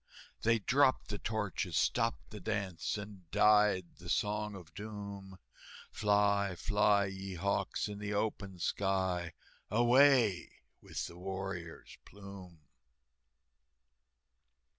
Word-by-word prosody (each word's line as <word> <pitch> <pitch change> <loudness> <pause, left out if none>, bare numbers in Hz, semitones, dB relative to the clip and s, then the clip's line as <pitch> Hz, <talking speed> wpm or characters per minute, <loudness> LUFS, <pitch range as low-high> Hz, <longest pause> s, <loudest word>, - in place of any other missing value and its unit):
They 115 +1 +3
dropped 130 +2 +2
the 105 -1 -4
torches, 110 -4 -2
stopped 70 +4 0
the 105 - -7
dance, 100 -3 -2
And 100 -4 -9
died 105 -1 +4
the 85 0 -9
Song 105 0 0
of 85 -4 -12
Doom, 100 -2 -8 0.5
"Fly, 100 -2 +2
fly, 105 +1 +3
ye 95 -1 -6
hawks, 100 +4 -1
in 105 -1 -6
the 105 0 -4
open 100 -2 -2
sky, 95 -3 -1 0.4
Away 120 -4 +4 0.2
with - - -4
the 85 - -10
warrior's 95 -3 -6
plume!" 100 -5 -12
100 Hz, 105 wpm, -33 LUFS, 95-105 Hz, 0.5 s, died